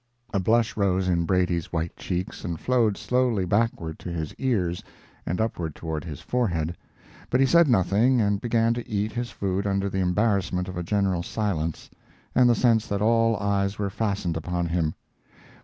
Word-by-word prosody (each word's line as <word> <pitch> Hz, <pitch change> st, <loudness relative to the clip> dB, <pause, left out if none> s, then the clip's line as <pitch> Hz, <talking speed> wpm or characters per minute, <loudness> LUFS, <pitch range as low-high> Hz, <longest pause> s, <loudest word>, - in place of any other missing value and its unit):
A 100 Hz, -, +2 dB
blush 115 Hz, +4 st, +2 dB
rose 95 Hz, -2 st, +1 dB
in 85 Hz, -2 st, +1 dB
Brady's 90 Hz, -2 st, 0 dB
white 80 Hz, 0 st, -2 dB
cheeks 90 Hz, 0 st, -4 dB
and 85 Hz, -2 st, -4 dB
flowed 115 Hz, -5 st, +2 dB
slowly 125 Hz, -6 st, +1 dB
backward 95 Hz, -5 st, 0 dB
to -, -, -7 dB
his 80 Hz, -3 st, -4 dB
ears 95 Hz, -10 st, 0 dB, 0.4 s
and 90 Hz, -, -1 dB
upward 90 Hz, -8 st, -2 dB
toward 80 Hz, -2 st, -4 dB
his 75 Hz, -5 st, -7 dB
forehead, 85 Hz, -10 st, -1 dB, 0.5 s
but 125 Hz, -, +2 dB
he 135 Hz, -, +5 dB
said 170 Hz, +4 st, +5 dB
nothing 115 Hz, +3 st, +3 dB
and 100 Hz, -2 st, +1 dB
began 115 Hz, -1 st, +2 dB
to 120 Hz, 0 st, -6 dB
eat 105 Hz, +1 st, -1 dB
his 120 Hz, +1 st, -3 dB
food 100 Hz, -1 st, -2 dB
under 100 Hz, 0 st, 0 dB
the 95 Hz, -, -1 dB
embarrassment 95 Hz, -1 st, +1 dB
of 95 Hz, -, -6 dB
a 90 Hz, -, -2 dB
general 95 Hz, 0 st, 0 dB
silence 85 Hz, -5 st, -2 dB, 0.5 s
and 125 Hz, -1 st, +5 dB
the 120 Hz, -, +4 dB
sense 115 Hz, -3 st, +3 dB
that 100 Hz, 0 st, -1 dB
all 115 Hz, 0 st, +3 dB
eyes 100 Hz, 0 st, 0 dB
were 100 Hz, -1 st, -2 dB
fastened 100 Hz, -6 st, -1 dB
upon 85 Hz, +2 st, -2 dB
him. 85 Hz, -2 st, -1 dB
100 Hz, 175 wpm, -25 LUFS, 90-115 Hz, 0.5 s, he